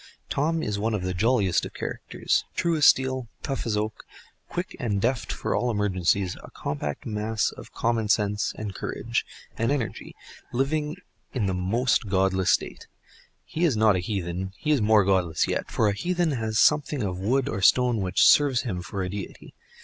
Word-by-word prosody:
Tom 160 +3 0
is 105 -1 -2
one 110 +1 0
of 100 - -3
the 95 0 -2
jolliest 100 -1 +2
of - - -7
characters, - - -2
true 170 -1 +1
as 150 -3 +5
steel, 130 -2 +3 0.2
tough 135 -4 -3
as 105 -2 0
oak, 110 +1 -3 0.5
quick 175 +1 -4
and 105 -5 -1
deft 120 +3 0
for - - -2
all 125 - +1
emergencies, 100 -3 +1
a - - -11
compact 75 0 -4
mass 110 0 -1
of - - -12
common 115 -2 0
sense, 105 -1 +1
and 105 -2 -5
courage, - - -2 0.4
and 115 +3 +1
energy, 135 -6 -3 0.4
living 150 +4 -1 0.4
in 115 -5 0
the 95 - 0
most 105 +5 +1
godless 95 -1 +2
state, - - 0 0.6
He 165 - -3
is 150 -10 +3
not 110 -2 +5
a - - +1
heathen—he 95 - -3
is 145 -5 +3
more 105 -1 +4
godless 90 -5 +1
yet; - - -2
for 110 - +1
a 100 - +2
heathen 175 - 0
has 110 -4 -2
something 150 -1 +3
of 90 -2 -3
wood 125 +7 +1
or 100 - -3
stone 120 +2 +4
which 90 -1 +3
serves 140 -4 +5
him 95 -7 -3
for 95 +3 -4
a 90 - -3
deity. 100 0 -8
110 Hz, 180 wpm, -26 LUFS, 95-130 Hz, 0.6 s, as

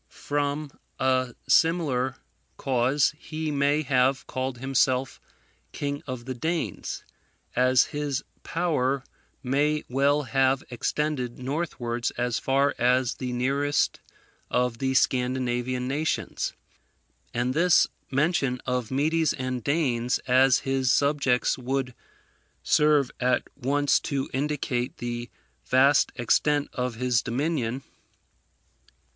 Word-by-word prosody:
From 145 0 -2 0.3
a 130 -2 +1
similar 145 -7 +2 0.4
cause 130 +2 +2
he 155 -1 -4
may 145 +1 +2
have 130 -1 +2
called 130 -1 -3
himself 130 0 0 0.5
King 145 0 -3
of 130 -2 -5
the 130 - -3
Danes, 160 - -3 0.5
as 130 0 +5
his 145 -2 -2 0.2
power 140 -6 0 0.4
may 145 +4 +1
well 140 +3 +2
have 135 +1 +2
extended 125 0 -2
northwards 125 -4 -2
as 120 -1 0
far 140 +1 +2
as 125 0 +2
the 125 -1 -4
nearest 140 +4 0 0.5
of 125 -2 0
the 130 0 0
Scandinavian 125 -1 0
nations; 150 +4 -2 0.8
and 125 +2 -1
this 170 +4 +5 0.2
mention 140 -3 +1
of 125 -3 -1
Medes 155 +4 +1
and 130 -2 -4
Danes 125 -4 +1
as 130 0 +4
his 135 -2 +1
subjects 140 -4 +2
would 130 0 -2 0.7
serve 150 -3 +3
at 125 0 +2
once 145 +3 +2
to 135 -2 -3
indicate 135 -3 -2
the 120 0 -4 0.3
vast 135 +2 +4
extent 145 +4 +1
of 125 -2 -2
his 125 0 +1
dominion. 130 -1 -2
130 Hz, 105 wpm, -26 LUFS, 125-145 Hz, 0.8 s, as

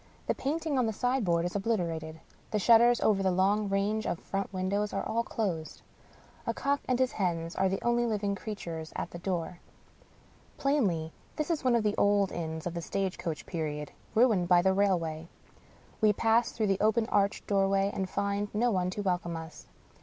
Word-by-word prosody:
The - - +1
painting 300 -1 -1
on 245 - +2
the 220 - -1
sign 250 +3 0
board 170 -2 +1
is 175 - -4
obliterated. 170 -7 -2 0.3
The 215 - 0
shutters 235 +3 +5
over 200 -2 +3
the 190 - +2
long 200 +3 +2
range 205 +2 0
of - - -1
front 195 +3 -4
windows 200 +2 -1
are - - -1
all 230 - 0
closed. 180 -10 -3 0.6
A - - 0
cock 280 0 0
and 255 - +2
his 255 0 +2
hens 170 -4 -2
are 190 - +2
the 195 - -3
only 240 0 +2
living 205 -2 0
creatures 170 -6 -6
at - - -4
the 170 - -7
door. 175 -2 -3 1.0
Plainly, 195 - 0 0.2
this 305 +2 -1
is 315 -4 -1
one 250 -2 +3
of 230 - +2
the 210 -1 +1
old 200 -1 +3
inns 160 -1 -4
of 175 - -3
the 170 - -4
stage 190 +2 -2
coach 160 -3 -4
period, 150 -4 -4 0.2
ruined 220 -6 +4
by 175 -1 +5
the 190 0 +4
rail 195 -1 +3
way. 160 -1 -5 0.7
We 215 -1 +5
pass 225 +3 +2
through 220 - -1
the 195 -1 +1
open 220 +2 +3
arched 200 0 +1
doorway, 195 0 +2
and 190 -1 -2
find 200 +1 -1
no 240 +3 +2
one 180 -3 0
to 205 +3 -4
welcome 175 -3 -1
us. 160 0 -10
195 Hz, 195 wpm, -30 LUFS, 175-220 Hz, 1.0 s, shutters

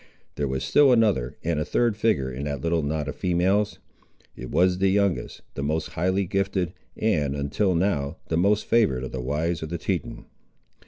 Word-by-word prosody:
There 70 - -2
was 65 0 -2
still 145 -2 +5
another 105 - +2
and 80 -2 0
a - - +1
third 120 +6 +1
figure 100 -12 +1
in 65 +3 -5
that 70 -3 -3
little 85 +1 +1
knot 75 0 -2
of 70 - -4
females. 95 +5 +1 0.6
It 65 - -8
was 90 +3 +2
the 95 0 +3
youngest, 100 -1 0
the - - -5
most 75 +3 -1
highly 95 +4 0
gifted, 95 -2 -1 0.2
and, 75 -11 +1
until 75 +7 0
now, 80 -6 0
the 80 - -1
most 100 +4 +2
favoured 100 - +2
of 65 - -5
the 65 - -4
wives 75 +6 -1
of 80 - -5
the 85 - -3
Teton. - - -3
85 Hz, 190 wpm, -25 LUFS, 70-100 Hz, 0.6 s, still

